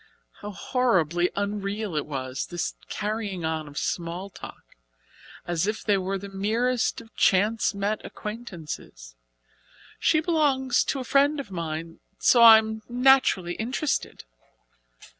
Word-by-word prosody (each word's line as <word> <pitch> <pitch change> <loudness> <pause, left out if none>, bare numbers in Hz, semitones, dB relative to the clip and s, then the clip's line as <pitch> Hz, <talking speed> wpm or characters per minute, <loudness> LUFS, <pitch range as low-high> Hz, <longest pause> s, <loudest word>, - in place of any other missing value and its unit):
How 205 - -7
horribly 180 - +1
unreal 200 -1 -3
it 150 - -2
was 130 -2 -4
this 175 -1 -3 0.2
carrying 210 -4 -3
on 160 -1 -2
of 145 0 -11
small 175 +3 -3
talk, - - -11 0.8
as 175 +2 -1
if 215 0 -2
they 205 - +2
were 190 +1 -2
the 200 +1 -8
merest 225 +7 0
of 225 -1 -19
chance 210 +3 +2
met 205 +2 -2
acquaintances! 175 - -8 0.9
"She 310 - +3
belongs 290 -6 +2
to 275 - -1
a - - -3
friend 280 +3 +3
of 265 -8 -7
mine, 165 -1 -5 0.2
so 240 - +4
I 225 -1 +11
am 220 0 -2
naturally 245 -8 +3
interested." 255 - -2
205 Hz, 130 wpm, -26 LUFS, 175-235 Hz, 0.9 s, I